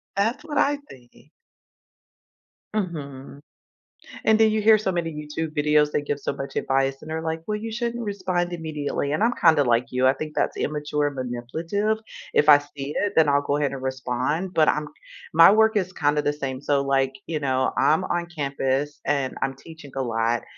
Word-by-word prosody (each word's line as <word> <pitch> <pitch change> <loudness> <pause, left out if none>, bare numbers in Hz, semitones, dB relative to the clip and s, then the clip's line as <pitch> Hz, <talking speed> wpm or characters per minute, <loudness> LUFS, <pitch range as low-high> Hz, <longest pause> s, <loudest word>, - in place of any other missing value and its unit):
That's 225 +9 0
what 305 -2 -5
I 290 0 +3
think. 120 -2 -17 1.5
Mhm. 140 -8 -5 0.9
And 220 0 +5
then 220 -1 +5
you 215 0 0
hear 220 0 +6
so 200 -2 -1
many 170 -2 -2
YouTube 150 +1 -5
videos, 150 0 +3
they - - 0
give 145 0 -3
so - - -3
much 135 - -6
advice 135 0 0
and 155 - -10
they're 160 0 -3
like, 160 0 -3
"Well 210 - -1
you 225 +1 -6
shouldn't 235 +1 -3
respond 185 -4 -2
immediately." 150 -3 -3
And 205 - +1
I'm 235 - +4
kinda 160 -4 +5
like 120 0 +2
you, 125 +1 +1
I 130 - +6
think 155 0 -7
that's - - 0
immature 150 0 -1
and 145 - -5
manipulative. 160 - -2 0.4
If 150 - +4
I 145 - +10
see 145 0 -7
it, 205 0 0
then 160 -2 +5
I'll 140 0 +3
go 145 0 -1
ahead 145 -2 0
and 135 -1 -6
respond, 130 +7 -2
but 155 -1 +4
I'm 150 0 +1 0.5
my 165 +2 +8
work 220 +1 +4
is 185 -1 -1
kinda 145 +1 +1
the 145 - +1
same. 135 -3 -4
So, 145 -1 +1
like, 135 -1 +1
you 160 -2 -3
know, 130 -2 0
I'm 160 +4 +3
on 175 -1 -1
campus 140 0 -1
and 135 -3 0
I'm 135 0 -1
teaching 160 -1 -13
a 135 - -1
lot, 115 0 0
150 Hz, 195 wpm, -24 LUFS, 135-175 Hz, 1.5 s, I